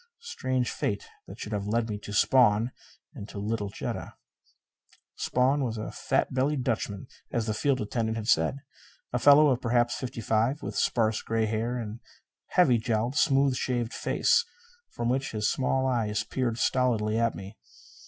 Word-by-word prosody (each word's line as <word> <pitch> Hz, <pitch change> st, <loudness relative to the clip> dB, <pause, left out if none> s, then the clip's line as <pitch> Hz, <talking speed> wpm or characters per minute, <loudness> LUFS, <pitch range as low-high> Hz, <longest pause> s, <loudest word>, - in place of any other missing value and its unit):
Strange 130 Hz, -, -2 dB
fate 100 Hz, -, -2 dB, 0.2 s
that -, -, -10 dB
should 105 Hz, -, -6 dB
have 100 Hz, -1 st, -2 dB
led 115 Hz, +2 st, 0 dB
me 105 Hz, -, -3 dB
to 105 Hz, -, -9 dB
Spawn! 115 Hz, +1 st, +4 dB, 0.4 s
And 100 Hz, -, -9 dB
to -, -, -9 dB
little 105 Hz, 0 st, -2 dB
Jetta! -, -, -5 dB, 1.0 s
Spawn 135 Hz, +3 st, +1 dB
was 115 Hz, -3 st, -2 dB
a 110 Hz, -, -5 dB
fat -, -, -1 dB
bellied 135 Hz, +1 st, 0 dB
Dutchman, 110 Hz, -5 st, -2 dB, 0.3 s
as 115 Hz, -2 st, -1 dB
the 110 Hz, -, -1 dB
field 135 Hz, +4 st, +1 dB
attendant 110 Hz, +1 st, -2 dB
had 110 Hz, -1 st, -5 dB
said. 80 Hz, +5 st, +2 dB, 0.6 s
A 125 Hz, -, +1 dB
fellow 145 Hz, +3 st, +7 dB
of 130 Hz, -2 st, +1 dB
perhaps 120 Hz, 0 st, +2 dB
fifty 125 Hz, -2 st, -5 dB
five, 115 Hz, +7 st, 0 dB
with -, -, -5 dB
sparse 110 Hz, -2 st, +1 dB
gray 115 Hz, 0 st, 0 dB
hair 115 Hz, +3 st, -1 dB
and 110 Hz, -2 st, -5 dB
a -, -, -40 dB, 0.5 s
heavy 130 Hz, -10 st, +5 dB
jowled, 115 Hz, +3 st, -1 dB
smooth 135 Hz, -3 st, +3 dB
shaved 120 Hz, -2 st, -2 dB
face -, -, +2 dB, 0.5 s
from 120 Hz, -, -3 dB
which 130 Hz, +1 st, -1 dB
his 105 Hz, -1 st, +1 dB
small 130 Hz, 0 st, 0 dB
eyes 110 Hz, -5 st, 0 dB
peered 120 Hz, 0 st, -2 dB
stolidly 115 Hz, -4 st, +1 dB
at 115 Hz, 0 st, +1 dB
me. 95 Hz, +2 st, -9 dB
115 Hz, 170 wpm, -28 LUFS, 110-130 Hz, 1.0 s, fellow